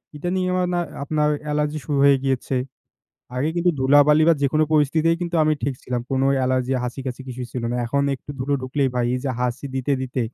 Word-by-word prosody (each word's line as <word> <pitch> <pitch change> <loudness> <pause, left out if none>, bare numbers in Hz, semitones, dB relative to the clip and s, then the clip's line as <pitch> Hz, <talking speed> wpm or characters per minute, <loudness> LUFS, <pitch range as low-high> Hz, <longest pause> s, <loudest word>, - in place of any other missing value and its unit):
এটা 175 +4 -3
নিয়ে 185 -1 0
না, 180 - 0
আমার 175 -1 -1 0.2
আপনার 150 0 +1 0.2
অ্যালার্জি 150 0 -1
শুরু 145 +1 -1
হয়ে 140 -1 +6
গিয়েছে। 135 0 -1 0.8
আগে 135 +5 0
কিন্তু 175 +1 +3
ধুলাবালি 145 +3 +5
বা 165 - +6
যেকোনো 155 +3 +3
পরিস্থিতি 155 +2 +3
কিন্তু 175 -1 -2
আমি 155 - +3
ঠিক 140 - -1
ছিলাম। 125 -1 -2
কোন 135 -1 +1 0.2
অ্যালার্জি, 130 0 0
হাঁচিকাশি 125 +1 -5
কিছুই 125 0 -5
ছিল 125 - -4
না। 120 - -1
এখন 140 +4 0
একটু 135 - -10
ধুলো 130 +3 -2
ঢুক 130 - -7
লেই 135 - +3
ভাই, 120 -1 +1
এই 125 - -1
যে 135 - 0
হাঁচি 125 +3 -2
দিতে, 135 +2 -1
দিতে 130 0 -3
140 Hz, 210 wpm, -22 LUFS, 130-150 Hz, 0.8 s, হয়ে